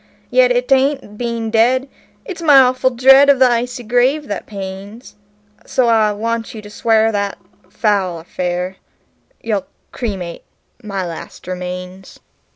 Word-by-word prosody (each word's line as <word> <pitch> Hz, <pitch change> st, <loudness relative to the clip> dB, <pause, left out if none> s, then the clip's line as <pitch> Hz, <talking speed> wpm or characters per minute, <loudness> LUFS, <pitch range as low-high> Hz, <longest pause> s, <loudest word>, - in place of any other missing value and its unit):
Yet -, -, +3 dB
'tain't 270 Hz, -5 st, +1 dB
being 235 Hz, -2 st, -3 dB
dead 250 Hz, +4 st, +2 dB, 0.4 s
it's 370 Hz, -6 st, -7 dB
my 295 Hz, -4 st, +7 dB
awful 255 Hz, 0 st, +3 dB
dread 265 Hz, +3 st, +6 dB
of 280 Hz, -, +6 dB
the 260 Hz, 0 st, +5 dB
icy 245 Hz, +1 st, -1 dB
grave 250 Hz, +6 st, +1 dB
that 205 Hz, -, -5 dB
pains; 200 Hz, +3 st, -8 dB, 0.5 s
So 250 Hz, -2 st, +1 dB
I 220 Hz, -2 st, +3 dB
want 225 Hz, +2 st, -3 dB
you 215 Hz, -, -7 dB
to 205 Hz, -, -11 dB
swear 225 Hz, 0 st, +2 dB
that, 200 Hz, -1 st, -2 dB, 0.3 s
foul 195 Hz, -4 st, 0 dB
or -, -, -17 dB
fair, 180 Hz, +1 st, -3 dB, 0.6 s
you'll 210 Hz, -4 st, -2 dB, 0.2 s
cremate 190 Hz, -8 st, -5 dB, 0.4 s
my 200 Hz, -3 st, -4 dB
last 165 Hz, -2 st, -9 dB
remains." 180 Hz, +1 st, -7 dB
225 Hz, 140 wpm, -17 LUFS, 195-255 Hz, 0.6 s, my